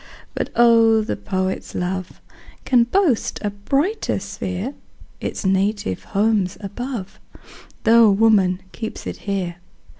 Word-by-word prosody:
But - - -3
oh! 230 -2 +5
the 215 - -2
poet's 190 -1 -3
love 185 0 -4 0.4
Can 245 -2 +4
boast 300 - +1
a 205 - -1
brighter 275 - -1
sphere; 195 +4 -4 0.5
Its - - -4
native 195 - 0
home's 205 -3 +1
above, 215 0 -6 0.6
Tho' 230 -1 +6
woman 195 -3 +3
keeps 220 -1 -6
it - - -5
here. 180 -3 -2
205 Hz, 115 wpm, -21 LUFS, 190-230 Hz, 0.6 s, Tho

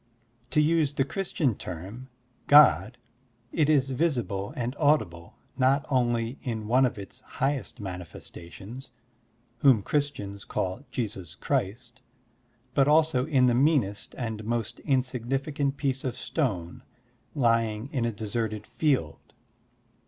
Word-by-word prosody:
To 150 - +2
use 150 -1 +3
the 135 - +2
Christian 160 - -1
term, 95 +9 -8 0.4
God, 120 - +6 0.5
it* 155 -2 +2
is 135 -3 +3
visible 120 - -1
and 125 +1 -2
audible 110 - +1 0.2
not 135 +3 +3
only 120 -1 +1
in 110 -4 -4
one 130 +3 +4
of 120 - -6
its 100 -1 -9
highest 135 -2 -3
mani 90 -3 -5
festations, 95 - -10 0.7
whom 125 -7 +5
Christians 105 -10 -2
call 95 +8 -3
Jesus 100 -9 -4
Christ, 120 +2 -3 0.7
but 135 +1 +3
also 150 -3 +3
in 135 -5 +4
the 125 - +4
meanest 125 -7 +1
and 110 -3 -4
most 115 -1 -2
insignificant 135 +2 -1
piece 135 -2 -1
of 130 - -2
stone 100 - -2 0.5
lying 115 -3 +1
in 130 -4 0
a 115 - 0
deserted 110 0 -3
field. 130 - -1
125 Hz, 125 wpm, -27 LUFS, 105-140 Hz, 0.7 s, God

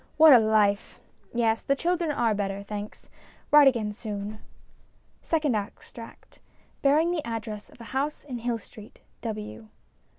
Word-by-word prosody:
What 315 -2 +9
a 245 - +9
life! 215 -2 +1 0.3
Yes, 230 -2 +1
the 275 - +1
children 340 +2 0
are 240 -6 +1
better, 200 -1 -3
thanks. 205 +1 -7 0.4
Write 295 -1 +8
again 225 -5 +1
soon. 210 -1 -6 0.8
SECOND 300 -7 0
EXTRACT 215 +2 -8 0.4
(Bearing 305 +5 +3
the 330 -4 -2
Address 220 -2 -6
of - - -19
a - - -9
House 285 +3 -2
in 255 -4 -6
Hill 235 0 -1
Street, 215 0 -15 0.2
W.) 210 - -6
230 Hz, 140 wpm, -26 LUFS, 210-280 Hz, 0.8 s, What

